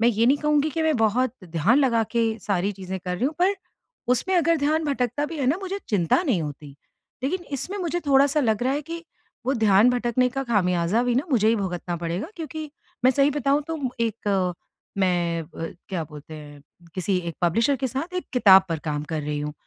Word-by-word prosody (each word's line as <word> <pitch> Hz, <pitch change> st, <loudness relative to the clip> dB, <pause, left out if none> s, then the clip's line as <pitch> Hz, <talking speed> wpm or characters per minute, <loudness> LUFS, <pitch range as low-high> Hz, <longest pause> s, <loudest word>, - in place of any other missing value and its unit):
मैं 235 Hz, -, +5 dB
ये 230 Hz, 0 st, +2 dB
नहीं 270 Hz, +3 st, +5 dB
कहूँगी 300 Hz, 0 st, +2 dB
कि 320 Hz, +3 st, -2 dB
मैं 315 Hz, -4 st, +2 dB
बहुत 225 Hz, +3 st, +2 dB
ध्यान 175 Hz, -, +2 dB
लगा 235 Hz, -5 st, +3 dB
के 235 Hz, -1 st, +2 dB, 0.2 s
सारी 200 Hz, 0 st, +1 dB
चीज़ें 190 Hz, -1 st, -6 dB
कर 180 Hz, 0 st, -3 dB
रही 235 Hz, -, -2 dB
हूँ, 300 Hz, +3 st, 0 dB
पर 375 Hz, +3 st, +3 dB, 0.6 s
उसमें 375 Hz, +10 st, -1 dB
अगर 335 Hz, -1 st, +3 dB
ध्यान 310 Hz, +2 st, +1 dB
भटकता 275 Hz, 0 st, -1 dB
भी 325 Hz, 0 st, -7 dB
है 270 Hz, -, 0 dB
ना 290 Hz, +6 st, +3 dB
मुझे 385 Hz, +1 st, -3 dB
चिंता 195 Hz, -, +2 dB
नहीं 240 Hz, -, +1 dB
होती। 145 Hz, -1 st, -7 dB, 0.5 s
लेकिन 350 Hz, +7 st, -2 dB
इसमें 380 Hz, +10 st, -5 dB
मुझे 350 Hz, -1 st, -2 dB
थोड़ा-सा 280 Hz, +2 st, +4 dB
लग 220 Hz, -3 st, +1 dB
रहा 260 Hz, -, +1 dB
है 290 Hz, +2 st, -2 dB
कि 335 Hz, 0 st, -5 dB, 0.4 s
वो 270 Hz, -, +2 dB
ध्यान 220 Hz, 0 st, +5 dB
भटकने 245 Hz, 0 st, +1 dB
का 270 Hz, +2 st, -3 dB
ख़ामियाज़ा 185 Hz, -2 st, +1 dB
भी 245 Hz, -1 st, +1 dB
ना 265 Hz, +6 st, +1 dB
मुझे 220 Hz, -4 st, +3 dB
ही 230 Hz, -, +3 dB
भुगतना 175 Hz, -3 st, -3 dB
पड़ेगा 170 Hz, -, -3 dB
क्योंकि 310 Hz, -2 st, -6 dB, 0.3 s
मैं 255 Hz, -, +7 dB
सही 275 Hz, +2 st, +3 dB
बताऊँ, 285 Hz, +1 st, +1 dB
तो 320 Hz, 0 st, -5 dB, 0.2 s
एक 200 Hz, -5 st, 0 dB, 0.4 s
मैं 175 Hz, -3 st, +1 dB
अ, 165 Hz, +1 st, -7 dB, 0.2 s
क्या 180 Hz, -4 st, -2 dB
बोलते 150 Hz, +1 st, -11 dB
हैं 145 Hz, -2 st, -11 dB, 0.3 s
किसी 185 Hz, +1 st, 0 dB
एक 165 Hz, -, -5 dB
पब्लिशर 230 Hz, -, +2 dB
के 265 Hz, -, -1 dB
साथ 280 Hz, +9 st, -4 dB
एक 365 Hz, -, -2 dB
किताब 195 Hz, -7 st, +7 dB
पर 165 Hz, -, -2 dB
काम 150 Hz, -1 st, -2 dB
कर 160 Hz, -1 st, -1 dB
रही 150 Hz, 0 st, -3 dB
हूँ, 150 Hz, 0 st, -4 dB
235 Hz, 210 wpm, -24 LUFS, 180-285 Hz, 0.6 s, मैं